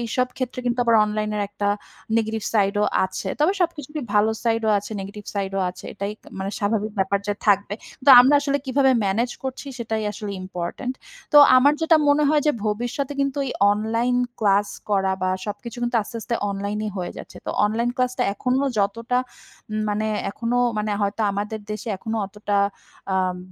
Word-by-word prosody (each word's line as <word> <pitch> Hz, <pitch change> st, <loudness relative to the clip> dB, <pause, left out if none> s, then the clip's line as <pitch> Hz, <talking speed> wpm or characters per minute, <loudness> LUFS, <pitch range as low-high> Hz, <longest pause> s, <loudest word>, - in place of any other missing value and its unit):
এইসব 240 Hz, +2 st, 0 dB
ক্ষেত্রে 255 Hz, -1 st, -3 dB
কিন্তু 240 Hz, +1 st, 0 dB
আবার 230 Hz, -1 st, +4 dB
অনলাইনের 210 Hz, 0 st, -2 dB
একটা 205 Hz, 0 st, -2 dB, 0.5 s
নেগেটিভ 220 Hz, -1 st, -1 dB
সাইডও 205 Hz, 0 st, +2 dB, 0.2 s
আছে। 190 Hz, +1 st, -4 dB
তবে 315 Hz, +6 st, +4 dB
সবকিছুরই 305 Hz, -3 st, -2 dB
ভালো 210 Hz, +1 st, +4 dB
সাইডও 225 Hz, -1 st, +1 dB
আছে, 205 Hz, -, -8 dB
নেগেটিভ 200 Hz, +1 st, -8 dB
সাইডও 195 Hz, -1 st, -1 dB
আছে। 180 Hz, -, -13 dB
এটাই 200 Hz, +1 st, -3 dB
ত -, -, -29 dB
মানে 190 Hz, +1 st, -3 dB
স্বাভাবিক 215 Hz, 0 st, -1 dB
ব্যাপার 195 Hz, +1 st, +2 dB
যে 205 Hz, -, 0 dB
থাকবে। 200 Hz, 0 st, +3 dB, 0.3 s
তো -, -, +9 dB
আমরা 270 Hz, +4 st, +5 dB
আসলে 285 Hz, 0 st, 0 dB
কিভাবে 265 Hz, +1 st, +3 dB
ম্যানেজ 225 Hz, +6 st, +1 dB
করছি, 265 Hz, +2 st, -5 dB
সেটাই 225 Hz, -2 st, -2 dB
আসলে 210 Hz, 0 st, -6 dB
ইম্পোর্টেন্ট। 185 Hz, +8 st, -4 dB, 0.4 s
তো -, -, +6 dB, 0.2 s
আমার 280 Hz, +3 st, +6 dB
যেটা 320 Hz, 0 st, +5 dB
মনে 290 Hz, +1 st, +4 dB
হয় 300 Hz, 0 st, +4 dB
যে, 300 Hz, -, +4 dB
ভবিষ্যতে 245 Hz, +6 st, -2 dB
কিন্তু 275 Hz, 0 st, 0 dB
এই -, -, -3 dB, 0.2 s
অনলাইন 230 Hz, +4 st, 0 dB, 0.2 s
ক্লাস 205 Hz, -1 st, +3 dB, 0.2 s
করা, 195 Hz, -2 st, +2 dB
বা 185 Hz, -, +1 dB, 0.2 s
সবকিছু 230 Hz, +4 st, -6 dB
কিন্তু 240 Hz, 0 st, 0 dB
আস্তে, 230 Hz, +3 st, -8 dB
আস্তে 235 Hz, -, -3 dB, 0.2 s
অনলাইনেই 205 Hz, +2 st, -3 dB
হয়ে 180 Hz, -1 st, -4 dB
যাচ্ছে। -, -, -10 dB
তো -, -, -1 dB
অনলাইন 230 Hz, +3 st, 0 dB
ক্লাসটা 250 Hz, 0 st, 0 dB
এখনো 255 Hz, +5 st, 0 dB
যতটা 230 Hz, +5 st, 0 dB, 0.5 s
উম 215 Hz, 0 st, -2 dB
মানে 215 Hz, +1 st, -1 dB, 0.2 s
এখনো 235 Hz, +3 st, -2 dB, 0.2 s
মানে 210 Hz, 0 st, -1 dB
হয়তো 200 Hz, +2 st, -1 dB
আমাদের 210 Hz, +2 st, -3 dB
দেশে 210 Hz, +2 st, -5 dB
এখনো 225 Hz, +3 st, -4 dB
অতটা 205 Hz, 0 st, -3 dB, 0.6 s
আম 185 Hz, -1 st, +1 dB
215 Hz, 175 wpm, -23 LUFS, 200-250 Hz, 0.6 s, তো